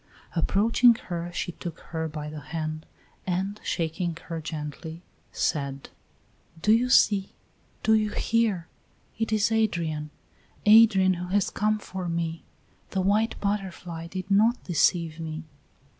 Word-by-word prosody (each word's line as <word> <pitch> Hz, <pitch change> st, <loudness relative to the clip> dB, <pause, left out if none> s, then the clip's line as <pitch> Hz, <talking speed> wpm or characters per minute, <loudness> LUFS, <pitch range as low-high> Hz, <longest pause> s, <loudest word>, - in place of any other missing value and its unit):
Approaching 230 Hz, +7 st, +4 dB
her 175 Hz, -4 st, -5 dB
she 175 Hz, -, -3 dB
took 170 Hz, -1 st, -7 dB
her 160 Hz, -1 st, -2 dB
by 150 Hz, -1 st, -6 dB
the 150 Hz, 0 st, -6 dB
hand, 155 Hz, 0 st, -5 dB, 0.4 s
and, 190 Hz, +3 st, -2 dB
shaking 165 Hz, 0 st, -2 dB
her 165 Hz, -2 st, -5 dB
gently, 160 Hz, +2 st, -6 dB, 0.3 s
said: 140 Hz, -4 st, -2 dB, 0.7 s
"Do 210 Hz, -, +3 dB
you 240 Hz, +3 st, +4 dB
see? 200 Hz, -5 st, +4 dB, 0.5 s
Do 220 Hz, -, +4 dB
you 215 Hz, -1 st, +3 dB
hear? 210 Hz, -6 st, 0 dB, 0.5 s
It 225 Hz, -1 st, -1 dB
is 215 Hz, +1 st, +2 dB
Adrian 170 Hz, -9 st, 0 dB, 0.6 s
Adrian 210 Hz, -3 st, +7 dB
who 180 Hz, 0 st, -5 dB
has 195 Hz, +1 st, +1 dB
come 215 Hz, +1 st, +1 dB
for 185 Hz, -3 st, -5 dB
me; 165 Hz, -1 st, -2 dB, 0.5 s
the 190 Hz, -, -1 dB
white 210 Hz, +4 st, +1 dB
butterfly 185 Hz, -5 st, -3 dB
did 185 Hz, +2 st, -6 dB
not 220 Hz, +5 st, +4 dB
deceive 170 Hz, -2 st, +1 dB
me." 160 Hz, 0 st, -5 dB
180 Hz, 130 wpm, -26 LUFS, 165-210 Hz, 0.7 s, Adrian